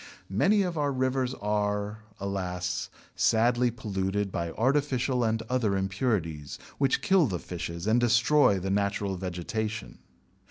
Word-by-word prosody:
Many 195 Hz, -, +3 dB
of 175 Hz, -4 st, -2 dB
our 145 Hz, -1 st, +1 dB
rivers 130 Hz, -1 st, 0 dB
are, 105 Hz, 0 st, -1 dB, 0.2 s
alas, 90 Hz, -2 st, -3 dB, 0.3 s
sadly 120 Hz, +2 st, +3 dB
polluted 100 Hz, -3 st, -2 dB
by 85 Hz, -1 st, -2 dB
artificial 130 Hz, -, +1 dB
and 115 Hz, 0 st, 0 dB
other 115 Hz, -4 st, 0 dB
impurities 95 Hz, -, -2 dB, 0.2 s
which 135 Hz, -2 st, +2 dB
kill 190 Hz, -6 st, +4 dB
the 95 Hz, -5 st, -2 dB
fishes 85 Hz, 0 st, -6 dB
and 110 Hz, +3 st, +3 dB
destroy 120 Hz, 0 st, +4 dB
the 95 Hz, +1 st, -2 dB
natural 100 Hz, 0 st, 0 dB
vegetation. 90 Hz, -, -4 dB
105 Hz, 125 wpm, -28 LUFS, 95-125 Hz, 0.3 s, kill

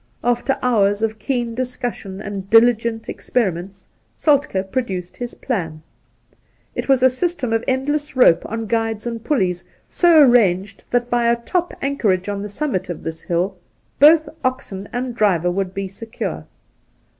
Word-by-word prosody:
After 245 Hz, +3 st, +1 dB
hours 205 Hz, -4 st, +2 dB
of 220 Hz, 0 st, -1 dB
keen 240 Hz, 0 st, -2 dB
dis 250 Hz, +1 st, -3 dB
cussion 200 Hz, -5 st, -5 dB
and 195 Hz, -1 st, -6 dB
dOigent 230 Hz, 0 st, +3 dB
experiments, 190 Hz, -4 st, -3 dB, 0.3 s
Soltkd 270 Hz, -11 st, +1 dB
produced 190 Hz, -9 st, -3 dB
his 245 Hz, -1 st, -6 dB
plan. 165 Hz, -, -4 dB, 0.9 s
It -, -, -4 dB
was 265 Hz, -2 st, +4 dB
a -, -, +9 dB
system 260 Hz, -4 st, -2 dB
of 225 Hz, +1 st, +1 dB
endless 290 Hz, +3 st, -1 dB
rope 250 Hz, -10 st, +5 dB
on 225 Hz, +1 st, -4 dB
guides 225 Hz, 0 st, -1 dB
and 230 Hz, -1 st, -4 dB
puUeys, 185 Hz, -, 0 dB, 0.2 s
so 340 Hz, -3 st, +5 dB
arranged 200 Hz, -6 st, +2 dB
that 245 Hz, 0 st, 0 dB
by 240 Hz, -1 st, +2 dB
a -, -, +3 dB
top 350 Hz, +9 st, -2 dB
anchorage 210 Hz, -9 st, 0 dB
on 200 Hz, -1 st, -3 dB
the 205 Hz, -, -5 dB
summit 205 Hz, -4 st, -2 dB
of 175 Hz, -, -6 dB
this 160 Hz, 0 st, -5 dB
hill 180 Hz, +3 st, -1 dB, 0.4 s
both 310 Hz, +2 st, +7 dB, 0.2 s
oxen 230 Hz, -7 st, -3 dB
and 245 Hz, 0 st, -3 dB
driver 185 Hz, -6 st, +2 dB
would 190 Hz, 0 st, -2 dB
be 195 Hz, 0 st, -4 dB
secure. 225 Hz, +4 st, -6 dB
225 Hz, 155 wpm, -20 LUFS, 195-255 Hz, 0.9 s, a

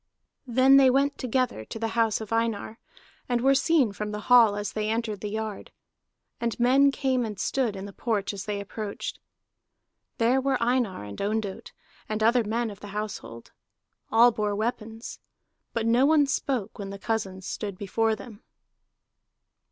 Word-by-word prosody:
Then 260 Hz, +3 st, +6 dB
they 270 Hz, -1 st, +7 dB
went 275 Hz, +2 st, +1 dB
together 255 Hz, -, -1 dB
to -, -, -7 dB
the 225 Hz, 0 st, -2 dB
house 225 Hz, -2 st, +1 dB
of 220 Hz, 0 st, -5 dB
Einar, 225 Hz, -1 st, -1 dB, 0.5 s
and 245 Hz, -1 st, +2 dB
were 270 Hz, +3 st, +4 dB
seen 275 Hz, -4 st, +3 dB
from 210 Hz, +2 st, -5 dB
the 210 Hz, 0 st, -5 dB
hall 230 Hz, -2 st, +6 dB
as 205 Hz, 0 st, -3 dB
they 215 Hz, 0 st, -1 dB
entered 220 Hz, -2 st, -2 dB
the 210 Hz, -, -3 dB
yard, 215 Hz, -1 st, -5 dB, 0.7 s
and 235 Hz, 0 st, -2 dB
men 270 Hz, +3 st, +5 dB
came 260 Hz, -2 st, 0 dB
and 210 Hz, -4 st, -5 dB
stood 240 Hz, -1 st, 0 dB
in 195 Hz, 0 st, -6 dB
the 200 Hz, -, -9 dB
porch 215 Hz, -3 st, -1 dB
as 195 Hz, -1 st, -6 dB
they 205 Hz, -1 st, -3 dB
approached. 200 Hz, +1 st, -6 dB, 1.0 s
There 245 Hz, +3 st, +3 dB
were 275 Hz, 0 st, +1 dB
Einar 235 Hz, -, 0 dB
and 100 Hz, -1 st, -8 dB
Ondott, 205 Hz, -1 st, -3 dB, 0.4 s
and 215 Hz, 0 st, -1 dB
other 235 Hz, +2 st, +4 dB
men 225 Hz, +1 st, -1 dB
of 200 Hz, -, -11 dB
the 205 Hz, -, -9 dB
household. 200 Hz, -, -6 dB, 0.6 s
All 235 Hz, +2 st, +6 dB
bore 210 Hz, -2 st, -1 dB
weapons. 225 Hz, +1 st, -4 dB, 0.5 s
But 230 Hz, -1 st, -2 dB
no 240 Hz, +4 st, +4 dB
one 305 Hz, -1 st, +5 dB
spoke 260 Hz, -6 st, -2 dB
when 200 Hz, -1 st, -5 dB
the 200 Hz, -, -6 dB
cousins 195 Hz, -3 st, -3 dB
stood 200 Hz, -3 st, -5 dB
before 220 Hz, +3 st, 0 dB
them. 220 Hz, -2 st, -12 dB
225 Hz, 165 wpm, -26 LUFS, 205-245 Hz, 1.0 s, they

